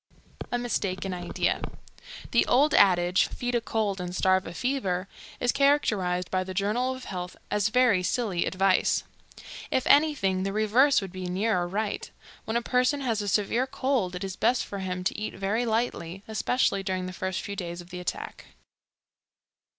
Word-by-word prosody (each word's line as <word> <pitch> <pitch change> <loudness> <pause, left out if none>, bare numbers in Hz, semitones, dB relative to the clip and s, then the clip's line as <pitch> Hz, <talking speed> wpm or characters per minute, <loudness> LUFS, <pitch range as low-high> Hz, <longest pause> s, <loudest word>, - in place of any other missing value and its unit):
A 245 - +1
Mistaken 195 -6 -2
Idea. 175 -1 -1 0.7
The - - +3
old 285 +5 +4
adage. 180 -2 +4
"Feed 245 0 -4
a 240 - +2
cold 210 -4 -1
and 180 0 -5
starve 185 0 +2
a 165 - -7
fever." 195 -9 -1 0.3
is 245 - +2
characterized 210 -11 +1
by 185 0 +1
the 185 0 -7
Journal 235 +7 0
of 260 - -10
Health 180 -1 -6
as 205 0 +2
very 235 -5 +4
silly 190 -3 0
advice. 190 0 +2 0.7
If 260 - 0
anything, 285 -12 +3
the 195 +1 -2
reverse 220 +6 +4
would 195 -2 -6
be 185 -1 -5
nearer 185 -1 0
right. 205 +3 -3 0.4
When 220 +2 0
a 235 - -2
person 250 +4 +1
has 230 -5 0
a 205 - -4
severe 220 +6 +1
cold 255 -9 -1
it 180 - -5
is 190 -1 -4
best 250 +5 +1
for 200 - -6
him 180 -1 -3
to - - -1
eat 215 - -4
very 215 +5 -1
lightly, 200 -5 -2
especially 220 -1 +1
during 185 -1 -2
the 185 - -6
first 185 0 -3
few 200 - -5
days 175 -2 -5
of 175 0 -11
the 180 - -6
attack. 180 - -5
200 Hz, 175 wpm, -27 LUFS, 185-245 Hz, 0.7 s, old